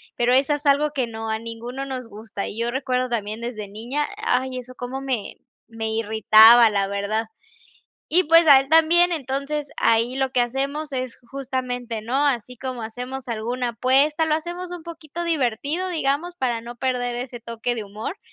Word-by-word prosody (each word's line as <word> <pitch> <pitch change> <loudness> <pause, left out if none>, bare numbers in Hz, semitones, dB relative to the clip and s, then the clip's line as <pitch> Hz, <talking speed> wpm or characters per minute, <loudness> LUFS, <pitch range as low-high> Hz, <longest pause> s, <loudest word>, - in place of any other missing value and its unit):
Pero 240 +1 +2
eso 275 +3 +3
es 295 +1 -4
algo 290 +1 +3
que 265 -4 -1
no, 225 -1 -6
a 220 - 0
ninguno 235 +4 -6
nos 260 -3 -5
gusta. 210 -2 -6
Y 210 - -7
yo 235 +1 0
recuerdo 255 -1 -1
también 215 -1 -3
desde 225 -3 -5
niña. 240 +9 -3
Ay, 260 - -1
eso 255 0 -8
cómo 255 +2 -5
me 255 -7 -3 0.3
me 225 -1 -4
irritaba, 220 +1 +6
la 200 -2 0
verdad. 200 +3 -1 0.9
Y, 360 +4 +5
pues, 330 +1 +5
a 280 -2 +9
él 270 - -4
también. 330 +3 +5
Entonces, 280 0 -2
ahí 230 +3 +2
lo 265 -1 0
que 250 - +3
hacemos 275 +5 -2
es 255 -2 -4
justamente, 250 -4 -4
¿no?, 260 +6 0
así 250 -3 -1
como 255 -1 -5
hacemos 250 +4 -6
alguna 240 +2 -2
apuesta, 275 +7 +2
lo 310 - +1
hacemos 345 +3 -4
un 355 -2 -6
poquito 330 0 -7
divertido, 300 - -1
digamos, 320 +1 -1
para 245 -7 -1
no 240 +1 -9
perder 245 -1 -1
ese 245 0 -6
toque 235 +1 -3
de 225 - -4
humor. 210 - -6
255 Hz, 180 wpm, -23 LUFS, 230-285 Hz, 0.9 s, a